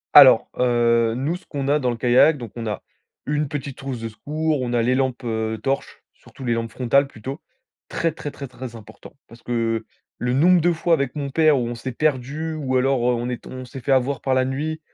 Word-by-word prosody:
Alors, - - +9
heu, 115 -2 +3
nous, 145 +7 -1
ce - - -22
qu'on 140 -2 -3
a 145 +2 +3
dans 125 -3 0
le 120 - -2
kayak, 125 +6 +5
donc 120 -3 -8
on 115 -1 -5
a 105 - -4 0.4
une 150 +1 0
petite 140 -2 -5
trousse 135 -3 -5
de 115 0 -4
secours. 150 +5 -2
On 125 -1 -2
a 120 -1 +2
les 125 +2 +2
lampes, 130 -1 0
heu, 110 -1 -2
torches, 135 0 -3
surtout 130 - -12
les 120 - +1
lampes 115 0 -2
frontales 135 +4 +2
plutôt. 135 +4 -8 0.5
Très, 165 - 0
très, 150 -1 -6
très, 140 -1 -8
très 120 -1 -9
important. 110 +4 -13
Parce 115 0 -15
que, 120 - -8
heu, 115 -1 0 0.3
le 125 0 0
nombre 175 +6 +5
de 175 +2 +3
fois 170 +1 +1
avec 140 -4 0
mon 140 -2 -3
père 155 -1 +4
où 120 - -1
on 120 - -3
s'est 120 +2 -5
perdu 150 +3 -1
ou 135 -4 -1
alors 135 0 +2
on 120 0 +1
est 125 -1 -4
tom - - -10
on 130 - -8
s'est 130 +1 -9
fait 135 - -2
avoir 135 +1 +2
par 135 -1 +1
la 130 0 +3
nuit 150 +4 -3
130 Hz, 235 wpm, -22 LUFS, 120-145 Hz, 0.5 s, Alors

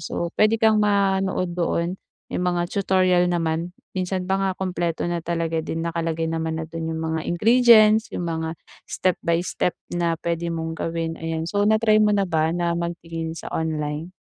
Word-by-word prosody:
So, 170 +1 -4
puwede 215 +1 +3
kang 220 -1 +4
manood 195 -3 +1
doon, 170 +1 -1 0.4
may - - -1
mga 175 -1 0
tutorial 185 -3 +3
naman, 170 0 -1 0.2
minsan 185 0 -2
pa 190 +1 +1
nga, 195 -1 +1
kumpleto 175 -3 -2
na 175 0 -1
talaga 165 -1 -1
din, 165 +1 -4
nakalagay 165 -1 -2
naman 160 0 -2
na - - -3
do'n 165 0 -5
'yung 160 - -4
mga 160 0 -2
ingredients, 220 +2 +5
'yung 175 - -3
mga 160 0 -3 0.3
step 185 -2 0
by 170 0 +2
step 180 - -1 0.2
na 170 -1 0
puwede 170 0 -2
mong 165 0 -3
gawin, 165 0 -3
ayan. 165 0 -3
So 205 +5 0
na 220 - +5
try 215 -1 +3
mo 210 -1 +4
na 200 - +2
ba 160 -3 +1
na 170 0 0
magtingin 165 -1 -4
sa - - -7
online? 155 +1 -3
170 Hz, 180 wpm, -23 LUFS, 165-190 Hz, 0.4 s, ingredients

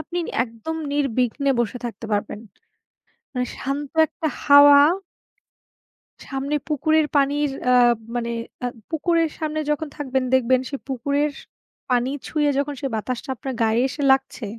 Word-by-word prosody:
আপনি 345 +3 -5 0.3
একদম 230 +7 -6 0.2
নির্বিঘ্নে 275 0 0
বসে 240 +1 -2
থাকতে 230 -2 -6
পারবেন। 205 0 -2 0.9
মানে 250 -1 -1
শান্ত 275 +1 -4
একটা 315 - -4 0.2
হাওয়া। 285 0 +8 1.4
সামনে 275 +2 -3
পুকুরের 310 +1 +2
পানির 285 +1 +2 0.2
আ - - +5 0.4
মানে 235 -1 -2 0.3
আ 245 - +1 0.2
পুকুরের 330 0 +1
সামনে 310 -1 -2
যখন 310 +1 -2
থাকবেন 265 -3 -1
দেখবেন 260 0 +4
সেই 275 - -5
পুকুরের 280 +3 0 0.6
পানি 250 0 +2 0.2
ছুঁয়ে 300 -2 +1
যখন 285 +1 -1
সেই 275 - -2
বাতাসটা 240 +4 -4
আপনার 265 +2 -5
গায়ে 225 +1 +2
এসে 285 +2 -6
লাগছে 265 -3 0
275 Hz, 130 wpm, -22 LUFS, 250-295 Hz, 1.4 s, হাওয়া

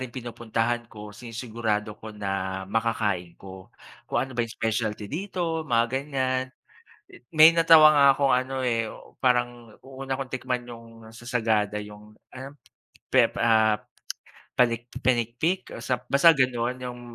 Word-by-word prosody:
ring 130 -2 -6
pinupuntahan 120 -1 -3
ko, 105 -2 -10
sinisigurado 110 -2 -4
ko 110 0 -9
na 95 -2 -3
makakain 105 -5 -1
ko. 95 -1 -12 0.4
Kung - - 0
ano 135 - -6
ba - - +1
'yung 115 - -9
specialty 110 -2 -2
dito, 170 -1 -3
mga 115 -3 +3
ganiyan. 130 -2 -1 0.9
May 155 +1 +9
natawa 165 -2 +7
nga 145 -1 +5
akong 140 -1 +2
ano, 130 +1 -1
eh, 115 -2 0
u - - -14
parang 120 -3 0
u 135 0 -9
una 135 0 -2
kong 135 -1 -6
tikman 125 -1 -3
'yung 115 -1 -10 0.3
sa 120 +1 -13
Sagada 110 -4 0
'yung 105 +1 -13 0.2
ano, 130 +1 -8 0.7
pep - - +4
ah, 110 -2 +3 0.8
panik 120 -1 +1
pinikpik 125 +9 0
o - - -8
sa 125 0 0
basta 140 +5 +6
gano'n. 125 -1 0
'Yung 120 0 -7
120 Hz, 145 wpm, -25 LUFS, 110-130 Hz, 0.9 s, May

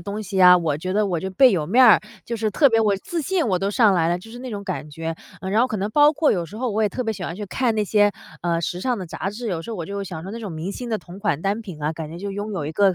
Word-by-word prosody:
东 205 +4 -5
西 195 -1 -6
呀， 180 -1 +8
我 160 -4 0
觉 185 +4 -3
得 210 +1 +2
我 175 -3 -1
就 190 - -4
倍 255 +7 +6
有 165 -8 0
面 245 +9 +5
儿， 225 - +7 0.2
就 235 - -4
是 215 0 -1
特 285 -3 +5
别 225 -1 +3
我 220 - +2
我 - - +1
自 335 - -4
信 340 +1 0
我 185 -3 +1
都 195 +2 -1
上 210 -1 +4
来 165 -2 +2
了， 175 - +1
就 205 +5 -12
是 240 - -9
那 255 +1 -7
种 205 -4 -5
感 185 -6 -5
觉。 165 +2 -5 0.2
嗯， 190 - -4
然 215 +3 +3
后 250 - +4
可 220 - -3
能 200 +1 -2
包 295 +5 +5
括 300 0 +2
有 175 -3 0
时 205 +7 -11
候 250 0 -2
我 215 +1 0
也 210 - +3
特 250 - -3
别 225 -2 -1
喜 185 -3 -6
欢 165 - -4
去 205 +3 -5
看 235 +2 0
那 215 - +1
些， 205 0 +3 0.3
呃， 170 -1 0
时 175 +2 -3
尚 250 +1 0
的 190 - -5
杂 185 - -4
志， 225 +4 -5
有 175 -5 -2
时 165 - -8
候 225 - -4
我 170 - -4
就 200 +5 -6
会 200 - -3
想 175 -4 -7
着 195 - -6
那 230 - -6
种 210 -6 -6
明 160 +4 -4
星 245 +4 -6
的 220 -2 -1
同 180 0 -12
款 200 -7 -1
单 200 +3 0
品 175 -8 -9
啊， 150 +2 0
感 160 -1 -6
觉 165 - -8
就 200 +3 -5
拥 205 +2 -4
有 180 -7 -3
一 150 - -3
个 195 +3 +3
200 Hz, 380 characters per minute, -22 LUFS, 175-225 Hz, 0.3 s, 呀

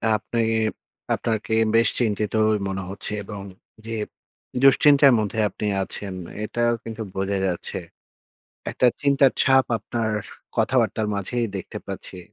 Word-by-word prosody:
আপনি 110 +2 -3 0.7
আপনাকে 110 -1 -1 0.2
বেশ 115 -1 +5
চিন্তিতই 110 -1 +1
মনে 95 0 -3
হচ্ছে। 100 +2 -4
এবং 100 -1 -7 0.4
যে 115 0 -4 0.7
দুশ্চিন্তার 140 0 +7
মধ্যে 110 +1 -2
আপনি 105 - -5 0.2
আছেন, 100 0 -6 0.3
এটাও 120 +2 +1
কিন্তু 115 0 -6
বোঝা 95 +1 -1
যাচ্ছে। 90 -2 -3 0.9
একটা 125 - +2
চিন্তার 140 -2 +4
ছাপ 135 -1 +5
আপনার 115 -1 -2 0.5
কথাবার্তার 110 - +2
মাঝেই 115 +4 -1
দেখতে 95 - -6
পাচ্ছি। 95 - -7
110 Hz, 115 wpm, -23 LUFS, 100-120 Hz, 0.9 s, দুশ্চিন্তার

